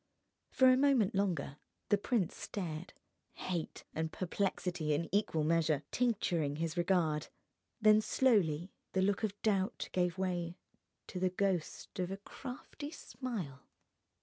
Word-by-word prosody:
For 260 - +5
a 255 - +5
moment 265 -7 +4
longer 175 -8 0 0.3
the 205 - +5
prince 205 -4 0
stared, 175 -2 -5 0.4
hate 175 -3 -4
and 160 0 -2
perplexity 180 -4 -1
in 165 +3 -1
equal 200 -6 +2
measure 155 -2 +2
tincturing 175 - +1
his 165 +1 -2
regard. 170 -4 +2 0.5
Then 215 -1 +6
slowly 190 - +2 0.2
the 190 - +3
look 200 0 +2
of 205 -1 -1
doubt 200 0 +1
gave 180 -1 +1
way 175 -2 -1 0.5
to 185 - -5
the 185 0 +2
ghost 185 -2 -2
of 180 -1 0
a 195 - -3
crafty 255 +7 -8
smile. 225 - -5
185 Hz, 130 wpm, -34 LUFS, 165-210 Hz, 0.5 s, Then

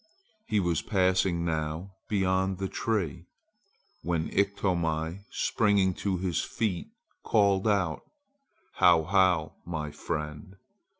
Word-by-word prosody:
He 105 - +2
was 85 -4 +1
passing 95 -3 +1
now 80 +3 -2 0.2
beyond 95 -1 +1
the 95 +1 -2
tree, 95 - -2 0.7
when 85 -2 -1
Iktomi, 90 -3 0
springing 100 -7 +2
to 95 0 -2
his 90 -3 -1
feet, 105 -7 -2 0.4
called 100 -1 +3
out: 95 -7 +1 0.8
"How, 85 -2 +6
how, 90 -3 +2
my 75 -3 -4
friend! 75 +3 -5
90 Hz, 105 wpm, -28 LUFS, 80-100 Hz, 0.8 s, How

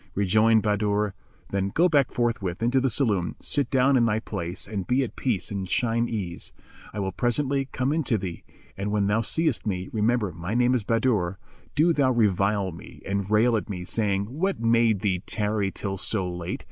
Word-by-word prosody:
Rejoined 110 +3 +3
Bahadur, 105 -1 +1 0.4
"Then 100 0 0
go 170 - +3
back 145 -6 +2
forthwith 115 -6 -1
into 125 +3 +2
the 135 - +2
saloon, 105 -10 0
sit 145 -1 -1
down 135 0 +3
in 120 -2 +4
thy 105 -1 +1
place 100 -5 -4
and 100 -3 -4
be 130 +2 +2
at 125 - -6
peace 110 -8 -1
and 95 -2 -3
at - - -11
shine 115 0 +1
ease; 95 -7 -4 0.4
I - - -9
will 95 -1 -1
presently 135 +6 0
come 130 +3 0
in 160 0 0
to 115 - +2
thee, 90 -4 -6 0.3
and 100 +2 -3
when 105 -1 +1
thou 105 +3 +2
seest 155 -2 0
me 95 -2 -2
(remember 110 -2 +1
my 85 +6 -5
name 125 +1 +3
is 125 -4 +1
Bahadur) 110 -5 +1 0.4
do 165 +3 +4
thou 140 -4 +2
revile 100 -4 +2
me 85 - -12
and 100 0 -2
rail 115 +3 +4
at 110 - -2
me, 90 -3 -5
saying, 100 -1 0
'What 195 +2 0
made 115 -3 +3
thee 95 -4 0
tarry 105 -2 0
till 95 0 -4
so 95 -2 0
late?' 90 -1 -4
110 Hz, 195 wpm, -25 LUFS, 100-120 Hz, 0.4 s, in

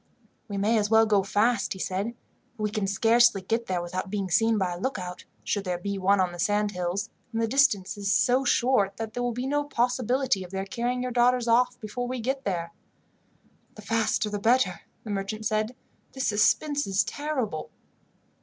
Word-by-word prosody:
"We 200 -3 -4
may 215 +3 +2
as 205 -1 0
well 225 0 +6
go 210 -2 +3
fast," 210 +3 +1
he 190 - -11
said, 195 +6 -2 0.4
"for 215 - -5
we 210 - 0
can 210 -2 -1
scarcely 230 +2 +4
get 225 +5 -2
there 180 -2 -1
without 185 +2 -4
being 195 -2 -3
seen 225 +5 +3
by 185 -3 0
a 175 - -7
lookout, 185 -6 -4 0.2
should 205 - -1
there 180 -2 -2
be 200 +2 -4
one 195 +1 +3
on 185 -1 +1
the 175 - -10
sand 205 +3 +1
hills, 180 +1 -3 0.2
and 225 - -2
the 225 - +1
distance 225 -7 +2
is 200 -1 -1
so 250 +5 +3
short 240 -6 +2
that 225 -1 -5
there 245 - -3
will 245 0 0
be 245 +2 -4
no 290 +2 0
possibility 250 -4 0
of 180 - -10
their 190 +1 -4
carrying 245 +3 -2
your 250 - -3
daughters 245 0 +3
off, 245 +1 +3
before 235 +3 -4
we 255 0 -3
get 265 +3 -2
there." 170 -3 -2 1.0
"The 215 - -11
faster 220 0 0
the 205 0 -3
better," 220 -4 +2 0.2
the 215 - -6
merchant 205 +2 -3
said. 215 +3 0 0.4
"This 265 -1 -2
suspense 285 +8 +2
is 195 +1 +2
terrible." 260 - -3
215 Hz, 200 wpm, -26 LUFS, 195-245 Hz, 1.0 s, well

